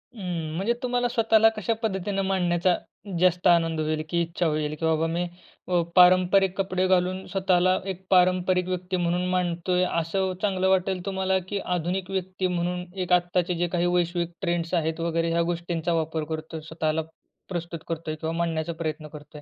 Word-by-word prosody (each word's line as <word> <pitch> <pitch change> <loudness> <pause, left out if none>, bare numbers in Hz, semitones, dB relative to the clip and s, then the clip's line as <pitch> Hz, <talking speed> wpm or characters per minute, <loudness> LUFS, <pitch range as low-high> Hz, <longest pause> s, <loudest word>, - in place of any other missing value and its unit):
हं, 170 -6 -4
म्हणजे 200 +7 +1
तुम्हाला 245 0 +1
स्वतःला 225 -1 +4
कशा 215 +2 0
पद्धतीनं 195 -2 -1
मांडण्याचा 180 -2 +2 0.4
जास्त 180 0 +3
आनंद 165 -2 +3
होईल? 155 0 -1
की 170 -1 +1
इच्छा 170 +1 -2
होईल 155 -1 0
की 165 - -1
बाबा 160 0 +2
मी, 170 +2 -1 0.4
अ, 180 -1 +2
पारंपरिक 185 +1 +5
कपडे 185 -1 0
घालून 185 0 +1
स्वतःला 185 -1 +2 0.2
एक 190 +1 -17
पारंपरिक 180 0 +3
व्यक्ती 185 0 -2
म्हणून 175 +1 0
मांडतोय 180 0 0
असं 185 +3 0
चांगलं 190 -2 +1
वाटेल 185 -1 +1
तुम्हाला? 190 -1 0
की 200 0 -2 0.2
आधुनिक 180 +2 -2
व्यक्ती 185 0 -2
म्हणून 180 0 -2 0.2
एक 180 0 0
आत्ताचे 175 0 +2
जे 175 +1 0
काही 175 0 +1
वैश्विक 175 -1 0
ट्रेंड्स 170 -2 -1
आहेत 160 -1 0
वगैरे, 165 0 0
ह्या 170 0 +2
गोष्टींचा 170 0 -2
वापर 160 -1 -1
करतोय 160 0 -5
स्वतःला 160 0 -1 0.5
प्रस्तुत 170 -2 -4
करतोय 160 -1 -3
किंवा 160 +1 -4
मांडण्याचा 165 -1 -1
प्रयत्न 155 -1 -3
करतोय? 150 0 -12
175 Hz, 165 wpm, -26 LUFS, 165-185 Hz, 0.5 s, पारंपरिक